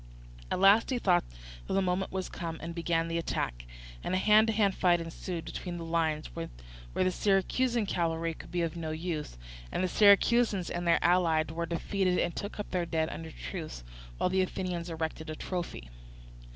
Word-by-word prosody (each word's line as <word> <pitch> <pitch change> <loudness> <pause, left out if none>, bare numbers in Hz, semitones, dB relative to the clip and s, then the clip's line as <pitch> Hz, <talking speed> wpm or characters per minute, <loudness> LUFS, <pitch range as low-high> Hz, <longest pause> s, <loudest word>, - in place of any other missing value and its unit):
At - - -1
last 200 +4 +6
he 260 - +1
thought 180 -6 +3 0.4
that - - -2
the - - +4
moment 185 0 0
was 190 -1 -2
come, 165 -2 -5
and 170 +1 -6
began 165 -1 0
the 165 0 -1
attack; - - -3 0.4
and - - -1
a - - +3
hand 215 +3 +5
to 225 - +1
hand 205 -2 +3
fight 175 -2 +3
ensued 165 +1 -5
between 175 -2 -5
the 165 - -6
lines, 160 -2 -1
where 165 0 -4 0.5
the 185 0 +2
Syracusan 215 +5 +1
cavalry 165 -3 -1
could - - -12
be 175 -1 0
of 165 -1 -2
no 165 -2 -4
use; 155 - -4 0.3
and - - -1
the - - +2
Syracusans 205 0 +4
and 175 0 -2
their 170 - +5
allies 165 -3 +3
were 170 +1 -3
defeated 180 +2 0
and 170 - 0
took 205 +1 -5
up 205 - -5
their 175 -2 0
dead 160 -1 0
under 165 0 -6
truce, 160 - -7 0.3
while 180 - +1
the 190 0 +3
Athenians 180 -2 -3
erected 160 -1 -4
a 155 - -4
trophy. 170 - -5
175 Hz, 190 wpm, -30 LUFS, 165-190 Hz, 0.5 s, last